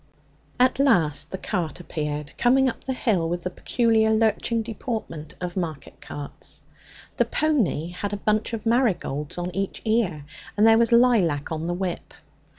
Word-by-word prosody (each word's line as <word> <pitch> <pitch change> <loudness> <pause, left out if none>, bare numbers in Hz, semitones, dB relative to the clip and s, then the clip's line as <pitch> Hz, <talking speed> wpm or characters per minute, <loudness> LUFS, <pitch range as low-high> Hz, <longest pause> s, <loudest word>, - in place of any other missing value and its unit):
At 255 +1 +3
last 175 - +2
the 190 - -4
cart 175 -6 -3
appeared, 150 -3 -4
coming 265 +2 +4
up 255 - -4
the 265 - -1
hill 190 -10 0
with 175 +1 -2
the 180 - -4
peculiar 225 +2 +2
lurching 225 +1 +1
deportment 215 - -5
of 180 -1 -4
market 160 -6 -5
carts. 145 -1 -9 0.5
The - - +3
pony 235 - 0
had 190 +3 -4
a 205 - -2
bunch 215 +2 0
of 225 -1 -4
marigolds 210 - 0
on 175 0 -4
each 195 0 -3
ear, 215 -10 0 0.3
and 210 - +5
there 225 0 +6
was 235 +1 +3
lilac 215 - +3
on 160 +1 -3
the 175 - -1
whip. 180 -1 -4
195 Hz, 160 wpm, -24 LUFS, 165-230 Hz, 0.5 s, there